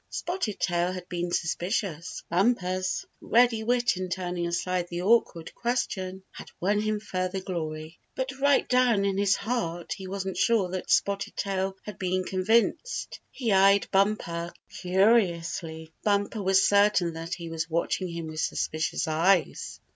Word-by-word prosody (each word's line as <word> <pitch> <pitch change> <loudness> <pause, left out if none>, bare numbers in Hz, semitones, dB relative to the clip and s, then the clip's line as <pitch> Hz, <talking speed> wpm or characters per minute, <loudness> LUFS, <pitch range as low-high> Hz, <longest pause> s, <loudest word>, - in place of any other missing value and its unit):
Spotted 350 - -3
Tail 175 0 0
had 180 -1 -7
been 175 0 -2
suspicious, 175 0 -2
but 170 - -3
Bumper's 185 -3 +1 0.2
ready 235 -1 +3
wit 240 -2 +2
in 185 0 -3
turning 175 -1 -2
aside 175 +1 -1
the 175 0 -4
awkward 190 -6 +2
question 190 -6 -2
had - - -10
won 205 +3 +1
him 215 0 -1
further 185 -2 -3
glory. 160 -3 -5 0.2
But 260 0 -2
right 280 0 +3
down 245 -5 +3
in 195 0 0
his 200 -1 +3
heart 175 -7 -3
he 190 - -8
wasn't 195 0 -4
sure 220 -6 +2
that 185 0 -5
Spotted 200 0 +1
Tail 195 -1 -2
had 210 -1 -9
been 185 -1 0
convinced. 220 - 0
He 235 -5 -2
eyed 195 +1 +4
Bumper 190 -4 +1 0.2
curiously. 170 -5 +1
Bumper 205 +1 +1
was 190 0 +4
certain 200 -4 +3
that 165 +2 -5
he 165 -1 -8
was 160 0 -3
watching 170 +3 -1
him 170 -1 -5
with 155 0 -6
suspicious 160 0 -1
eyes. 165 +3 +1
185 Hz, 150 wpm, -27 LUFS, 175-210 Hz, 0.2 s, eyed